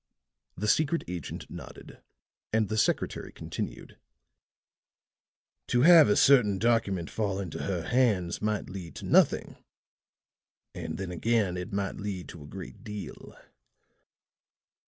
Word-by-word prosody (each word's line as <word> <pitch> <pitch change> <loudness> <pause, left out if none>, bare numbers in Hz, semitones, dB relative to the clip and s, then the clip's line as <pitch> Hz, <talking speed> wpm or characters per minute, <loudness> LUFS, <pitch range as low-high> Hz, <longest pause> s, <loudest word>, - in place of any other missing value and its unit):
The 105 - -2
secret 155 +7 +2
agent 85 -5 -6
nodded, - - -11 0.5
and 110 -2 +1
the 110 - -1
secretary - - 0
continued: - - -7 1.7
"To 120 - +2
have 165 -6 +8
a 105 - +4
certain 120 -8 +5
document 100 -6 +1
fall 100 -3 -1
into 95 -5 -5
her 90 -4 -2
hands 105 -7 +1
might 105 -1 -1
lead 90 -3 -8
to - - -7
nothing - - +3 1.2
and 80 -2 -5
then 95 -2 -5
again 100 0 +1
it 90 +4 -5
might 100 -1 -2
lead 100 -3 -5
to 85 - -10
a 70 - -11
great 95 +8 -9
deal." 105 -3 -8
100 Hz, 125 wpm, -28 LUFS, 90-115 Hz, 1.7 s, have